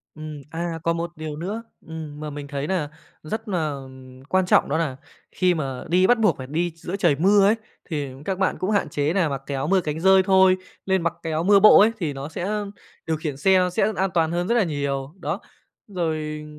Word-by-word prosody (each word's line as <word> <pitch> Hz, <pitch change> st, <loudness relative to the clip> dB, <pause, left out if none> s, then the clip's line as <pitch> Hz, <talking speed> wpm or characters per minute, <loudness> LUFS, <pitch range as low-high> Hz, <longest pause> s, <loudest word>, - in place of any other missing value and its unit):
Ừm, 155 Hz, -2 st, -8 dB
à, 165 Hz, 0 st, -3 dB
còn 165 Hz, 0 st, +1 dB
một 170 Hz, 0 st, -3 dB
điều 155 Hz, -1 st, -6 dB
nữa, 200 Hz, +8 st, -4 dB, 0.2 s
ừm, 155 Hz, -2 st, -7 dB
mà 150 Hz, -, -5 dB
mình 145 Hz, 0 st, -7 dB
thấy 140 Hz, 0 st, -3 dB
nà 160 Hz, -5 st, -1 dB, 0.3 s
rất 220 Hz, +7 st, -5 dB
nà, 165 Hz, -6 st, 0 dB
ừm, 130 Hz, -1 st, -10 dB
quan 185 Hz, +1 st, +2 dB
trọng -, -, +4 dB
đó -, -, 0 dB
là 150 Hz, -6 st, -1 dB, 0.3 s
khi 180 Hz, -1 st, +2 dB
mà 135 Hz, -5 st, -4 dB
đi 185 Hz, +2 st, +4 dB
bắt 245 Hz, +2 st, +4 dB
buộc 210 Hz, -9 st, +3 dB
phải 130 Hz, -, -6 dB
đi 165 Hz, +4 st, -1 dB
giữa 175 Hz, +4 st, -5 dB
trời 170 Hz, -7 st, +2 dB
mưa 195 Hz, +4 st, +5 dB
ấy, 215 Hz, -, +4 dB, 0.4 s
thì 145 Hz, -4 st, -2 dB, 0.2 s
các 190 Hz, -2 st, -2 dB
bạn 190 Hz, -, +1 dB
cũng 185 Hz, +3 st, -1 dB
hạn 200 Hz, -6 st, +1 dB
chế 145 Hz, +1 st, 0 dB
nà 180 Hz, -4 st, +2 dB
mặc 135 Hz, -2 st, -4 dB
cái 140 Hz, -, -4 dB
áo 135 Hz, +2 st, -2 dB
mưa 190 Hz, +3 st, +3 dB
cánh 155 Hz, -2 st, -4 dB
dơi 190 Hz, +1 st, +6 dB
thôi. 190 Hz, -1 st, +5 dB, 0.3 s
Lên 190 Hz, -2 st, +1 dB
mặc 170 Hz, -, 0 dB
cái 165 Hz, -, -3 dB
áo 155 Hz, +1 st, 0 dB
mưa 200 Hz, +1 st, +6 dB
bộ 215 Hz, -, +9 dB
ấy, 215 Hz, +3 st, +5 dB
thì 160 Hz, -6 st, -2 dB
nó 135 Hz, +1 st, -6 dB
sẽ 205 Hz, +6 st, -3 dB, 0.4 s
điều 160 Hz, -1 st, 0 dB
khiển 150 Hz, -3 st, -4 dB
xe 185 Hz, +4 st, +3 dB
sẽ 215 Hz, -, +1 dB
an 190 Hz, 0 st, +1 dB
toàn 165 Hz, -2 st, +2 dB
hơn 175 Hz, +2 st, -1 dB
rất 235 Hz, -, +2 dB
là 235 Hz, -4 st, +3 dB
nhiều, 140 Hz, -2 st, -3 dB
đó. -, -, -3 dB, 0.5 s
Rồi 155 Hz, -5 st, -3 dB
165 Hz, 235 wpm, -23 LUFS, 150-190 Hz, 0.5 s, bộ